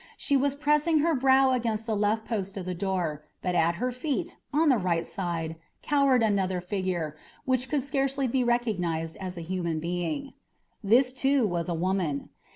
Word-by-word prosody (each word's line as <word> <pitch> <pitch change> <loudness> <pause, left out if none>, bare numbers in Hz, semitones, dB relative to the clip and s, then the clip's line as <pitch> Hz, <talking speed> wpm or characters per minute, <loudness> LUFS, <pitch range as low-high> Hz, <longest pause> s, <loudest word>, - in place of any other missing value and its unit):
She 285 - +1
was 275 +1 +2
pressing 300 +2 +2
her 335 - +3
brow 265 -1 +4
against 225 -3 -1
the 225 -2 -1
left 210 +2 +1
post 200 -4 -3
of 185 - -4
the 185 - -2
door, 175 -5 -2 0.2
but 180 - 0
at 170 0 +2
her 250 +8 -1
feet, 310 +7 -3 0.2
on 310 +1 +3
the 255 -5 +4
right 170 -3 0
side, 165 -3 -3 0.3
cowered 275 -4 +3
another 190 -4 +1
figure, 180 -4 -2 0.3
which 255 -1 0
could 290 -4 0
scarcely 275 -1 0
be 255 +1 +1
recognised 180 -10 0
as 185 -2 -6
a - - -4
human 170 -3 -2
being. 175 - -3 0.5
This, 250 +5 +4
too, 270 -1 +2
was 175 -3 -2
a 170 - 0
woman. 175 -4 -1
210 Hz, 175 wpm, -27 LUFS, 175-265 Hz, 0.5 s, brow